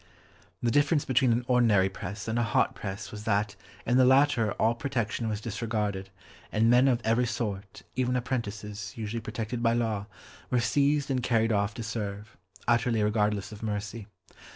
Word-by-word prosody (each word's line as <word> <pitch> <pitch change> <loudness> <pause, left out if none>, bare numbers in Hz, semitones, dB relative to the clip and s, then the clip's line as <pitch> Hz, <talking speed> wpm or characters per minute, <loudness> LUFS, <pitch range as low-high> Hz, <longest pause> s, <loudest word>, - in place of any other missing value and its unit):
The 120 - +2
difference 145 +3 +3
between 130 -1 +3
an 120 +1 +1
ordinary 115 -6 +4
press 100 +2 -6
and 110 +1 0
a - - +2
"hot 115 - +2
press" 100 +3 -6
was 105 -2 -7
that 105 -2 +1 0.3
in 120 +2 +3
the 130 - +6
latter 130 -4 +4
all 115 - +2
protection 115 -3 -2
was 105 -1 -2
disregarded, 105 -3 -3 0.4
and 115 +2 +3
men 125 +2 +6
of 120 -3 +2
every 115 +2 +2
sort, 100 -4 -4
even 125 0 +1
apprentices 105 -5 -3
usually 115 +1 -4
protected 110 +2 -4
by 115 -1 +3
law, 110 -4 -1 0.4
were 125 - +2
seized 140 +3 +2
and 130 -1 +1
carried 115 -1 +2
off 100 0 0
to 115 - -5
serve, 105 -2 -5 0.3
utterly 120 -2 +2
regardless 105 -2 0
of 105 - -10
mercy. 105 0 -4
115 Hz, 170 wpm, -28 LUFS, 105-120 Hz, 0.4 s, the